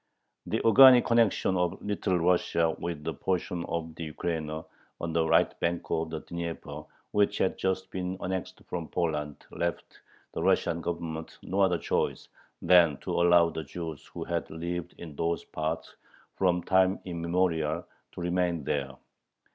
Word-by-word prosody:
The -, -, -1 dB
organic 125 Hz, +2 st, +9 dB
connection 115 Hz, -5 st, +3 dB
of 90 Hz, -1 st, 0 dB
Little 100 Hz, -2 st, -1 dB
Russia 85 Hz, -2 st, +2 dB
with 85 Hz, -3 st, -4 dB
the 80 Hz, -, -2 dB
portion 90 Hz, +2 st, -2 dB
of 80 Hz, -1 st, -4 dB
the 80 Hz, +1 st, -6 dB
Ukraina 80 Hz, -1 st, -3 dB, 0.3 s
on 85 Hz, -1 st, -3 dB
the 80 Hz, -1 st, +2 dB
right -, -, +4 dB
bank 85 Hz, 0 st, 0 dB
of 80 Hz, 0 st, 0 dB
the 80 Hz, -1 st, -5 dB
Dnieper 85 Hz, -1 st, -6 dB, 0.3 s
which 105 Hz, -1 st, +2 dB
had 95 Hz, -, +1 dB
just 95 Hz, 0 st, -2 dB
been 95 Hz, 0 st, -3 dB
annexed 95 Hz, 0 st, -4 dB
from 85 Hz, -3 st, -4 dB
Poland, 75 Hz, -4 st, -2 dB
left 85 Hz, 0 st, -4 dB, 0.3 s
the -, -, -3 dB
Russian 85 Hz, -, +2 dB
Government 80 Hz, -2 st, -5 dB
no 95 Hz, +2 st, -1 dB
other 90 Hz, -3 st, +4 dB
choice -, -, -1 dB, 0.3 s
than 85 Hz, -4 st, +6 dB
to -, -, -4 dB
allow 85 Hz, -1 st, +5 dB
the 80 Hz, -, -4 dB
Jews 80 Hz, 0 st, -7 dB
who -, -, -6 dB
had -, -, -3 dB
lived 85 Hz, +2 st, -5 dB
in 80 Hz, -4 st, -9 dB
those 85 Hz, +2 st, -1 dB
parts 80 Hz, +1 st, -4 dB, 0.4 s
from 90 Hz, -2 st, +1 dB
time 95 Hz, 0 st, +3 dB
immemorial 85 Hz, -2 st, 0 dB, 0.3 s
to -, -, -7 dB
remain 85 Hz, -2 st, 0 dB
there. 70 Hz, -1 st, -2 dB
85 Hz, 155 wpm, -29 LUFS, 80-90 Hz, 0.4 s, organic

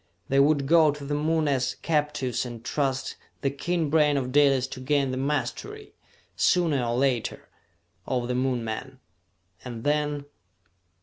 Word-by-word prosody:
They 135 Hz, -, +3 dB
would 140 Hz, 0 st, +3 dB
go 160 Hz, +1 st, +5 dB
to 145 Hz, -1 st, -4 dB
the 145 Hz, -, -3 dB
Moon 155 Hz, +1 st, +1 dB
as 135 Hz, -3 st, 0 dB
captives 150 Hz, -5 st, -1 dB
and 120 Hz, -2 st, -8 dB
trust 135 Hz, -1 st, -1 dB, 0.2 s
the 135 Hz, -, 0 dB
keen 160 Hz, +1 st, -1 dB
brain 150 Hz, -2 st, +4 dB
of 130 Hz, -2 st, -2 dB
Dalis 140 Hz, -2 st, +4 dB
to 130 Hz, -, -7 dB
gain 135 Hz, 0 st, +1 dB
the -, -, -2 dB
mastery, 150 Hz, -, -3 dB, 0.4 s
sooner 160 Hz, -8 st, +2 dB
or 120 Hz, 0 st, -1 dB
later, 130 Hz, -3 st, -1 dB, 0.6 s
over 125 Hz, -2 st, -1 dB
the 125 Hz, -, -2 dB
Moon 125 Hz, -1 st, 0 dB
men. 130 Hz, +4 st, -6 dB, 0.6 s
And 120 Hz, -3 st, -7 dB
then...." 145 Hz, -1 st, 0 dB
140 Hz, 150 wpm, -26 LUFS, 130-150 Hz, 0.6 s, go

